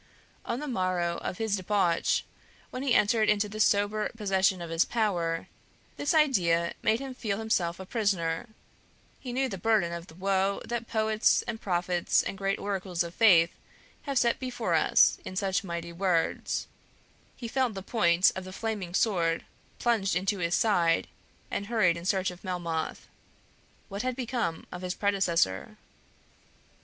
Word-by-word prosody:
On 235 Hz, -, -2 dB
the 300 Hz, -, -5 dB
morrow 185 Hz, -7 st, -1 dB
of 180 Hz, -, -5 dB
his 220 Hz, -2 st, 0 dB
debauch, 185 Hz, -3 st, +1 dB, 0.5 s
when 255 Hz, -, -5 dB
he 270 Hz, -3 st, +2 dB
entered 215 Hz, 0 st, +3 dB
into 210 Hz, 0 st, +2 dB
the 215 Hz, +1 st, -8 dB
sober 210 Hz, 0 st, +2 dB
possession 195 Hz, -3 st, +2 dB
of 170 Hz, -1 st, -6 dB
his 165 Hz, +1 st, +3 dB
power, 175 Hz, -8 st, -1 dB, 0.5 s
this 290 Hz, +3 st, 0 dB
idea 175 Hz, -, +3 dB
made 220 Hz, +1 st, +2 dB
him 270 Hz, -1 st, -6 dB
feel 215 Hz, -6 st, -3 dB
himself 190 Hz, -6 st, -1 dB
a 190 Hz, -, -7 dB
prisoner; 190 Hz, -3 st, -1 dB, 0.7 s
he 255 Hz, -, -6 dB
knew 265 Hz, +2 st, 0 dB
the 195 Hz, -7 st, -6 dB
burden 195 Hz, -5 st, +2 dB
of 170 Hz, +1 st, -6 dB
the 160 Hz, -, -14 dB
woe 195 Hz, +1 st, 0 dB
that 235 Hz, -1 st, -4 dB
poets, 220 Hz, 0 st, +2 dB
and 230 Hz, -2 st, -5 dB
prophets, 175 Hz, -1 st, +1 dB
and -, -, -4 dB
great 195 Hz, 0 st, 0 dB
oracles 190 Hz, -3 st, -2 dB
of 170 Hz, 0 st, -7 dB
faith 175 Hz, -7 st, +5 dB, 0.5 s
have 280 Hz, -2 st, -3 dB
set 235 Hz, -1 st, +2 dB
forth 255 Hz, -1 st, -5 dB
for -, -, -1 dB
us -, -, +4 dB
in 185 Hz, -, -7 dB
such 190 Hz, 0 st, 0 dB
mighty 170 Hz, -2 st, -5 dB
words; 175 Hz, -2 st, 0 dB, 0.7 s
he 240 Hz, -, -6 dB
felt 250 Hz, -2 st, 0 dB
the 195 Hz, -, -6 dB
point 180 Hz, -5 st, +3 dB
of 190 Hz, -, -5 dB
the 185 Hz, -, -9 dB
Flaming 200 Hz, -4 st, -4 dB
Sword 170 Hz, -7 st, +1 dB, 0.3 s
plunged 220 Hz, -5 st, +1 dB
into 190 Hz, +2 st, 0 dB
his 170 Hz, 0 st, +1 dB
side, 175 Hz, -7 st, +2 dB, 0.4 s
and 200 Hz, -, -3 dB
hurried 205 Hz, -7 st, +3 dB
in 170 Hz, 0 st, -8 dB
search 190 Hz, 0 st, +1 dB
of 180 Hz, -, -13 dB
Melmoth. 170 Hz, -4 st, -3 dB, 0.8 s
What 200 Hz, 0 st, -4 dB
had 255 Hz, -1 st, -2 dB
become 235 Hz, -10 st, -2 dB
of 180 Hz, -, -7 dB
his 180 Hz, 0 st, -3 dB
predecessor? 170 Hz, -, 0 dB
195 Hz, 165 wpm, -28 LUFS, 175-220 Hz, 0.8 s, faith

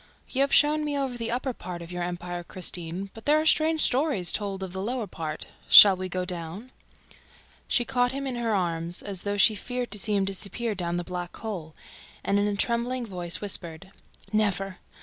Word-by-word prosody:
"You 265 Hz, -, +1 dB
have 275 Hz, -, +2 dB
shown 300 Hz, +1 st, +4 dB
me 295 Hz, -1 st, -2 dB
over 270 Hz, -3 st, -2 dB
the 230 Hz, -1 st, -4 dB
upper 255 Hz, +2 st, -2 dB
part 175 Hz, -5 st, -7 dB
of 170 Hz, -, -11 dB
your 180 Hz, 0 st, -4 dB
empire, 175 Hz, 0 st, -4 dB
Christine, 180 Hz, +1 st, -1 dB
but 225 Hz, -, -12 dB
there 300 Hz, +1 st, +4 dB
are 310 Hz, -, -1 dB
strange 315 Hz, 0 st, +4 dB
stories 255 Hz, -, +3 dB
told 195 Hz, -2 st, -3 dB
of 185 Hz, -2 st, -6 dB
the 190 Hz, -, -4 dB
lower 235 Hz, +2 st, -2 dB
part. 160 Hz, -4 st, -6 dB, 0.2 s
Shall 200 Hz, -2 st, +11 dB
we 185 Hz, 0 st, -5 dB
go 185 Hz, 0 st, -2 dB
down?" 180 Hz, +7 st, -6 dB, 1.0 s
She 240 Hz, -, +1 dB
caught 245 Hz, -1 st, +1 dB
him 275 Hz, +1 st, -4 dB
in 265 Hz, -, -3 dB
her 230 Hz, -3 st, 0 dB
arms, 170 Hz, -2 st, -2 dB
as 195 Hz, -3 st, -5 dB
though 205 Hz, 0 st, -2 dB
she 215 Hz, +2 st, +5 dB
feared 245 Hz, +4 st, -4 dB
to 210 Hz, -, 0 dB
see 210 Hz, +1 st, 0 dB
him 195 Hz, -1 st, +2 dB
disappear 200 Hz, +4 st, -3 dB
down 175 Hz, -3 st, -3 dB
the 175 Hz, -, -2 dB
black 180 Hz, 0 st, -6 dB
hole, 175 Hz, -8 st, -6 dB, 0.5 s
and, 200 Hz, -, +1 dB
in 205 Hz, -, +1 dB
a 205 Hz, -, -1 dB
trembling 235 Hz, +3 st, 0 dB
voice, 175 Hz, -5 st, -1 dB
whispered: 185 Hz, -2 st, -2 dB, 0.4 s
"Never! 195 Hz, -3 st, 0 dB
200 Hz, 205 wpm, -26 LUFS, 180-245 Hz, 1.0 s, Shall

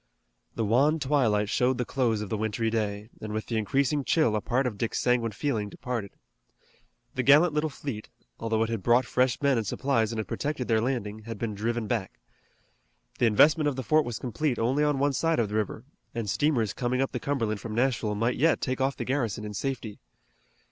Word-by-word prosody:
The 115 Hz, -, 0 dB
wan 135 Hz, +9 st, +3 dB
twilight 125 Hz, -8 st, +2 dB
showed 125 Hz, +4 st, +1 dB
the 125 Hz, -, -1 dB
close 115 Hz, -5 st, 0 dB
of 105 Hz, -, -5 dB
the 110 Hz, -, -1 dB
wintry 110 Hz, +1 st, -1 dB
day, 105 Hz, 0 st, -2 dB
and 110 Hz, -, -5 dB
with 110 Hz, 0 st, -3 dB
the 115 Hz, -, -2 dB
increasing 140 Hz, +7 st, +1 dB
chill 145 Hz, -7 st, +2 dB
a 105 Hz, -, 0 dB
part 130 Hz, +4 st, 0 dB
of 120 Hz, -4 st, -2 dB
Dick's 115 Hz, +2 st, -2 dB
sanguine 120 Hz, -2 st, +1 dB
feeling 105 Hz, -1 st, -2 dB
departed. 115 Hz, -3 st, -4 dB, 1.0 s
The 130 Hz, -, -1 dB
gallant 150 Hz, +5 st, +6 dB
little 150 Hz, +1 st, 0 dB
fleet, 130 Hz, -6 st, -6 dB, 0.3 s
although 115 Hz, -1 st, 0 dB
it 115 Hz, -, -2 dB
had 115 Hz, -3 st, -2 dB
brought 120 Hz, +5 st, +4 dB
fresh 125 Hz, -1 st, +1 dB
men 140 Hz, -4 st, +3 dB
and 110 Hz, -, -4 dB
supplies 115 Hz, -5 st, 0 dB
and 115 Hz, -, -4 dB
had 110 Hz, -3 st, -3 dB
protected 145 Hz, 0 st, -3 dB
their 110 Hz, -2 st, +2 dB
landing, 110 Hz, -4 st, -3 dB
had 115 Hz, -1 st, -6 dB
been 110 Hz, 0 st, -3 dB
driven 115 Hz, +3 st, -2 dB
back. -, -, -3 dB, 1.0 s
The 120 Hz, -, +4 dB
investment 150 Hz, +8 st, +5 dB
of 145 Hz, -, 0 dB
the 130 Hz, -, -4 dB
fort 155 Hz, +4 st, +3 dB
was 120 Hz, -4 st, -4 dB
complete 130 Hz, +1 st, -2 dB
only 130 Hz, +6 st, +1 dB
on 150 Hz, -2 st, +2 dB
one 140 Hz, +1 st, +1 dB
side 165 Hz, +4 st, +1 dB
of 115 Hz, -3 st, +1 dB
the 105 Hz, -, -4 dB
river, 110 Hz, +1 st, -2 dB, 0.3 s
and 115 Hz, -2 st, -2 dB
steamers 120 Hz, -1 st, +1 dB
coming 125 Hz, 0 st, -1 dB
up 135 Hz, -, 0 dB
the -, -, -3 dB
Cumberland 115 Hz, -8 st, -1 dB
from 110 Hz, -2 st, -5 dB
Nashville 120 Hz, -4 st, +1 dB
might 115 Hz, +4 st, 0 dB
yet 160 Hz, +2 st, +3 dB
take 130 Hz, 0 st, -2 dB
off 135 Hz, +1 st, 0 dB
the -, -, -3 dB
garrison 120 Hz, -6 st, -1 dB
in 105 Hz, -, -6 dB
safety. 115 Hz, -2 st, -4 dB
120 Hz, 210 wpm, -27 LUFS, 110-135 Hz, 1.0 s, gallant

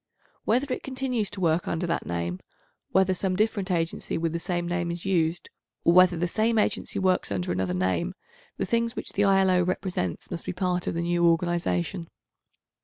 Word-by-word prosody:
Whether 255 Hz, +4 st, +1 dB
it -, -, -4 dB
continues 255 Hz, -5 st, -2 dB
to 205 Hz, -, -7 dB
work 170 Hz, -1 st, +1 dB
under 170 Hz, +2 st, -1 dB
that 170 Hz, -1 st, -2 dB
name, 85 Hz, +1 st, -2 dB, 0.5 s
whether 190 Hz, 0 st, +3 dB
some 185 Hz, 0 st, -1 dB
different 210 Hz, -2 st, 0 dB
agency 165 Hz, -2 st, -1 dB
with 165 Hz, 0 st, -1 dB
the 170 Hz, -, -1 dB
same 175 Hz, -1 st, -2 dB
name 175 Hz, 0 st, -1 dB
is 170 Hz, +1 st, -5 dB
used, 175 Hz, -2 st, 0 dB, 0.3 s
or 170 Hz, -, +5 dB
whether 185 Hz, -1 st, +6 dB
the 175 Hz, -, 0 dB
same 220 Hz, +5 st, +1 dB
agency 210 Hz, -, 0 dB
works 185 Hz, -, +1 dB
under 90 Hz, -3 st, -1 dB
another 90 Hz, 0 st, -1 dB
name, 95 Hz, -, 0 dB, 0.4 s
the -, -, -1 dB
things 230 Hz, -1 st, 0 dB
which -, -, -4 dB
the 205 Hz, -, +2 dB
I.L.O. 190 Hz, -2 st, +4 dB
represents 180 Hz, -, -2 dB
must 170 Hz, -2 st, -5 dB
be -, -, -2 dB
part 180 Hz, -1 st, -1 dB
of -, -, -1 dB
the 170 Hz, -, -1 dB
new 175 Hz, 0 st, +2 dB
organisation. 165 Hz, -, 0 dB
175 Hz, 185 wpm, -26 LUFS, 165-195 Hz, 0.5 s, whether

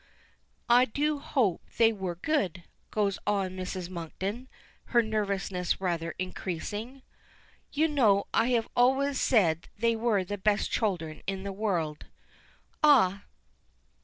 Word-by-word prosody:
"I 245 Hz, +1 st, +6 dB
do 295 Hz, +5 st, -1 dB
hope 235 Hz, -, 0 dB, 0.2 s
they 225 Hz, -1 st, +5 dB
were 190 Hz, -4 st, -4 dB
good," 185 Hz, -, -1 dB, 0.3 s
goes 200 Hz, -2 st, 0 dB
on 200 Hz, -3 st, +1 dB
Mrs. 185 Hz, -1 st, -5 dB
Monkton, 190 Hz, +7 st, -5 dB, 0.4 s
her 240 Hz, -1 st, +3 dB
nervousness 200 Hz, -4 st, -1 dB
rather 170 Hz, -3 st, -2 dB
increasing. 205 Hz, +8 st, -5 dB, 0.7 s
"You 310 Hz, +2 st, +2 dB
know 220 Hz, -10 st, +3 dB
I 225 Hz, -, +3 dB
have 235 Hz, -3 st, +1 dB
always 265 Hz, +2 st, +3 dB
said 175 Hz, -8 st, +2 dB
they 230 Hz, +2 st, +2 dB
were 220 Hz, -4 st, +1 dB
the 205 Hz, +2 st, -5 dB
best 210 Hz, +1 st, +1 dB
children 165 Hz, -8 st, -1 dB
in 195 Hz, -1 st, -3 dB
the 200 Hz, 0 st, -4 dB
world." 175 Hz, -7 st, -2 dB, 0.7 s
"Ah! 200 Hz, -10 st, +5 dB
205 Hz, 125 wpm, -29 LUFS, 185-240 Hz, 0.7 s, I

